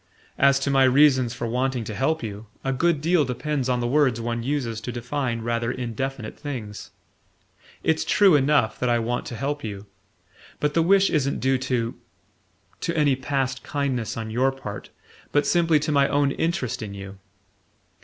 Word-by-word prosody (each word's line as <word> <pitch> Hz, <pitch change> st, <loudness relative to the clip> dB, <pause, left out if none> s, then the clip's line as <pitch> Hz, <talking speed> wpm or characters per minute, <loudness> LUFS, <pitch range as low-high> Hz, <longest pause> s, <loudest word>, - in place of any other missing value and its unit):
As 140 Hz, 0 st, +5 dB
to 140 Hz, -, 0 dB
my 135 Hz, -1 st, +4 dB
reasons 130 Hz, -2 st, +4 dB
for -, -, -4 dB
wanting 125 Hz, +1 st, -1 dB
to 110 Hz, -, -6 dB
help 135 Hz, +7 st, 0 dB
you, 105 Hz, 0 st, -6 dB, 0.2 s
a 135 Hz, -, 0 dB
good 160 Hz, +2 st, +1 dB
deal 165 Hz, 0 st, +3 dB
depends 135 Hz, +1 st, -2 dB
on 125 Hz, -1 st, +1 dB
the 120 Hz, -, 0 dB
words 130 Hz, -3 st, +2 dB
one 115 Hz, 0 st, -2 dB
uses 120 Hz, -4 st, -2 dB
to 125 Hz, -, -5 dB
define 120 Hz, -1 st, -3 dB
rather 115 Hz, 0 st, -1 dB
indefinite 125 Hz, -1 st, -4 dB
things. 115 Hz, -8 st, -6 dB, 0.9 s
It's 160 Hz, 0 st, +1 dB
true 195 Hz, -5 st, +5 dB
enough 140 Hz, -5 st, +2 dB
that 125 Hz, -, 0 dB
I 120 Hz, -, +3 dB
want 120 Hz, +1 st, -2 dB
to 120 Hz, -, -6 dB
help 145 Hz, +4 st, -3 dB
you; 100 Hz, -2 st, -6 dB, 0.7 s
but 150 Hz, 0 st, 0 dB
the 165 Hz, -, +3 dB
wish 195 Hz, +3 st, +4 dB
isn't 140 Hz, -3 st, 0 dB
due 130 Hz, 0 st, +1 dB
to... 120 Hz, -3 st, -1 dB, 0.9 s
to 170 Hz, -1 st, -2 dB
any 145 Hz, -3 st, +3 dB
past 130 Hz, -1 st, -2 dB
kindness 135 Hz, -7 st, -2 dB
on 110 Hz, -1 st, -4 dB
your 130 Hz, +4 st, +2 dB
part, 105 Hz, -7 st, -8 dB, 0.4 s
but 145 Hz, -, +2 dB
simply 165 Hz, -3 st, +3 dB
to 155 Hz, +1 st, -1 dB
my 140 Hz, -1 st, +4 dB
own 145 Hz, -1 st, +2 dB
interest 150 Hz, -7 st, -2 dB
in 100 Hz, -2 st, -6 dB
you. 100 Hz, 0 st, -9 dB
130 Hz, 175 wpm, -24 LUFS, 115-145 Hz, 0.9 s, As